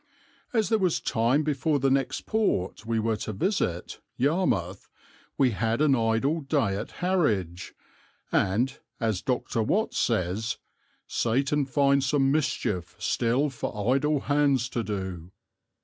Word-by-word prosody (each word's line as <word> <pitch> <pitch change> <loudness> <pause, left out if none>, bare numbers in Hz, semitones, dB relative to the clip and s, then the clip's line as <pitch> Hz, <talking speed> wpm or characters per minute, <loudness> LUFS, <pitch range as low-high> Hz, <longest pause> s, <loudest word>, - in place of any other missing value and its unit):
As 220 -4 +1
there 220 -1 +3
was 185 -4 +1
time 120 +7 +1
before 150 0 +1
the 135 -1 +1
next 135 -1 0
port 115 - -1
we 115 0 0
were 110 0 0
to 110 - -5
visit, 95 - -1 0.2
Yarmouth, 120 - 0 0.5
we 130 -3 +4
had 110 +4 -1
an 150 -2 +4
idle 115 +7 +1
day 135 -8 0
at 100 - -4
Harwich, 105 - 0 0.6
and, 110 +8 +1 0.2
as 110 -5 0
Dr. 125 -3 -1
Watts 210 - 0
says, 110 0 0 0.5
'Satan 140 +5 0
finds 140 0 +2
some 135 -1 +2
mischief 90 - -1
still 125 +9 +1
for 115 -1 -1
idle 150 +1 +1
hands 140 -4 +2
to 120 - -2
do.' 95 -5 -5
125 Hz, 135 wpm, -27 LUFS, 105-145 Hz, 0.6 s, we